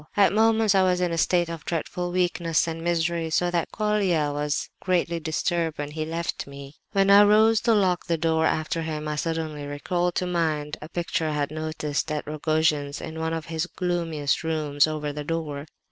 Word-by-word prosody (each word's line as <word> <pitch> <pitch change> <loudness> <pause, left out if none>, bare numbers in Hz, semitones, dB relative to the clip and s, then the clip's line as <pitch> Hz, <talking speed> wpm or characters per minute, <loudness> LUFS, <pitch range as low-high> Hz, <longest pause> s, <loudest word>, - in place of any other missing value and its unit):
"At 200 -3 +5
moments 220 -1 +4
I 190 - +4
was 180 -1 +2
in 180 -1 0
a 165 - -1
state 175 0 +2
of 165 -2 -6
dreadful 175 +1 -3
weakness 175 -2 +1
and 165 0 -4
misery, 170 -1 0
so 175 +2 +1
that 170 -1 -1
Colia 195 -8 +1
was 145 0 -1
greatly 170 -2 0
disturbed 165 0 -1
when 145 0 -4
he 155 +1 -3
left 165 -1 -3
me. 140 0 -10 0.2
"When 195 -1 +3
I 200 +1 +9
arose 215 +2 +5
to 230 -1 +3
lock 185 -4 +1
the 170 -2 +1
door 160 0 +2
after 155 +1 -1
him, 155 -1 -4
I 150 - -2
suddenly 150 -2 -3
called 175 +1 0
to 180 - 0
mind 155 -4 -1
a 155 - -8
picture 170 -2 -2
I - - -2
had 145 0 -1
noticed 155 -1 -3
at 150 -1 -2
Rogojin's 155 -1 0
in 160 0 -7
one 160 0 -1
of 160 -1 -5
his 165 +1 -2
gloomiest 170 -6 -1
rooms, 155 -2 +1
over 150 -1 -3
the 150 0 -5
door. 150 -2 -4
165 Hz, 195 wpm, -25 LUFS, 155-175 Hz, 0.2 s, I